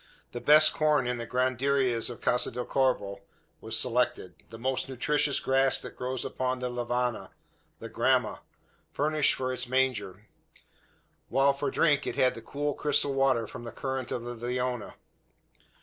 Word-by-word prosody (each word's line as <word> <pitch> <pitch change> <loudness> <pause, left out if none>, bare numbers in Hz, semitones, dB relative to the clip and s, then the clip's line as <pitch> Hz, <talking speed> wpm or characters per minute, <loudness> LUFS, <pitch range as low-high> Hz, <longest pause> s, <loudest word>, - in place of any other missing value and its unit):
The 120 - -6
best 155 +1 +7
corn 150 -4 +2
in 125 0 -2
the 115 - -5
granaderias 130 -1 +1
of 120 - -9
Casa 125 - +2
del 125 +1 -5
Corvo 105 -7 0 0.4
was 110 0 -1
selected, 125 -7 0 0.2
the 115 - -9
most 130 +3 -2
nutritions 140 +2 0
grass 135 0 +2
that - - -9
grows 130 0 -3
upon 130 0 -2
the 125 0 -3
lavanna 120 0 -2 0.5
the - - -8
gramma - - +1 0.5
furnished 150 0 +1
for 130 0 -2
its 130 - -5
manger; 110 -7 -1 1.0
while 135 +1 +3
for 140 +1 -2
drink 150 -4 +2
it - - -3
had 130 - +3
the 115 - -9
cool 145 +4 -3
crystal 145 -1 +1
water 135 -4 +2
from 120 - -9
the 115 - -7
current 130 -2 -4
of 120 - -3
the 120 0 -5
Leona. 125 0 -3
130 Hz, 160 wpm, -28 LUFS, 120-135 Hz, 1.0 s, best